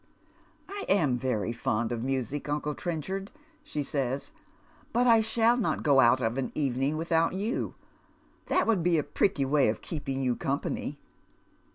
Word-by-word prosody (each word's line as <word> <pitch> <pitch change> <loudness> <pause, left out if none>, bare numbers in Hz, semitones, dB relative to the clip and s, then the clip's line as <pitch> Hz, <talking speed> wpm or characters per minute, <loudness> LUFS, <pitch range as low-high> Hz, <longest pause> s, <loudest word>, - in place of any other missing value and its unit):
" - - -32 0.3
I 400 0 -5
am 150 -10 +3
very 120 -3 -1
fond 115 0 -1
of 120 -1 -2
music, 135 +2 -2
uncle 150 0 -1
Trencliard," 175 +8 -3 0.4
she 150 - -3
says, 135 - -2 0.6
"but 245 +2 +3
I 230 -2 +6
shall 230 +2 +3
not 240 - -1
go 140 -3 +5
out 130 +1 +5
of 115 +3 0
an 130 - -2
evening 135 +1 0
without 165 +1 +1
you. 205 +6 -2 0.7
That - - +2
would 220 -6 +2
be 170 0 +3
a 150 - +1
pretty 160 -5 +1
way 140 -3 +3
of 105 - -3
keeping 135 -4 -3
j'ou 125 -2 0
company." 140 +1 -2
145 Hz, 165 wpm, -28 LUFS, 130-180 Hz, 0.7 s, I